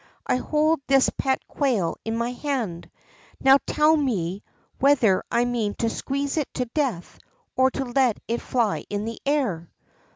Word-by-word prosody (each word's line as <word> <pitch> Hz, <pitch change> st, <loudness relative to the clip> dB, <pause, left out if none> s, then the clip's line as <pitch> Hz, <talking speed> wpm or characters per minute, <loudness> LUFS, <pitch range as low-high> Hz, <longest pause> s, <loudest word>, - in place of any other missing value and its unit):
I -, -, +1 dB
hold 310 Hz, +3 st, +1 dB
this 270 Hz, -1 st, +4 dB
pet 265 Hz, -1 st, -1 dB
quail 240 Hz, -, 0 dB
in 225 Hz, 0 st, -2 dB
my 235 Hz, +1 st, -1 dB
hand; 245 Hz, -, -3 dB, 0.5 s
now 270 Hz, +1 st, +6 dB
tell 305 Hz, +1 st, +4 dB
me 200 Hz, -, -1 dB, 0.4 s
whether 250 Hz, -9 st, +4 dB
I 235 Hz, +1 st, +2 dB
mean 230 Hz, -4 st, -1 dB
to 230 Hz, -1 st, -1 dB
squeeze 280 Hz, +2 st, -3 dB
it 300 Hz, -, -1 dB
to 250 Hz, -, -1 dB
death, 240 Hz, -, -3 dB, 0.4 s
or 260 Hz, 0 st, +4 dB
to 270 Hz, +1 st, -4 dB
let 245 Hz, -2 st, +1 dB
it 235 Hz, +1 st, -2 dB
fly 235 Hz, -5 st, 0 dB
in 205 Hz, 0 st, -3 dB
the 230 Hz, 0 st, -5 dB
air." 230 Hz, -, 0 dB
250 Hz, 160 wpm, -24 LUFS, 220-275 Hz, 0.5 s, now